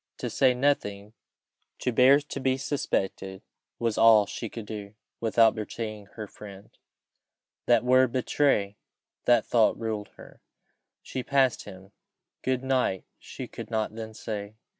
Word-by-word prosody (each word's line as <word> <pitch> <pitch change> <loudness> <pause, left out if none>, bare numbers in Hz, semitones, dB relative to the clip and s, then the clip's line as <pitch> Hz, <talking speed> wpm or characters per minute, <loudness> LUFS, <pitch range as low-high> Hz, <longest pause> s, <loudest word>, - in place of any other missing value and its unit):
To - - -4
say 130 -2 +3
nothing 105 -6 -1 0.6
to 125 - -1
bear 130 +4 +6
to 145 -1 -7
be 130 -1 +1
suspected, 95 -8 -3 0.3
was 115 -2 -1
all 110 -2 +7
she 115 +2 -6
could 115 0 -8
do, 105 -1 -8 0.2
without 115 0 +4
betraying 110 -1 -6
her 110 - -5
friend. 100 -1 -13 0.9
That 120 -2 +4
word 130 0 +4
betray 120 -6 +1 0.5
that 120 -3 +4
thought 115 -3 +2
ruled 110 -2 -3
her. - - -15 0.6
She 130 - -4
passed 135 -2 +1
him: 95 -1 -12 0.5
"Good 130 0 -1
night" 130 -8 0 0.2
she - - -8
could 115 -2 -9
not 110 -2 -1
then 110 -1 -8
say. 105 -2 -6
115 Hz, 140 wpm, -27 LUFS, 105-130 Hz, 0.9 s, all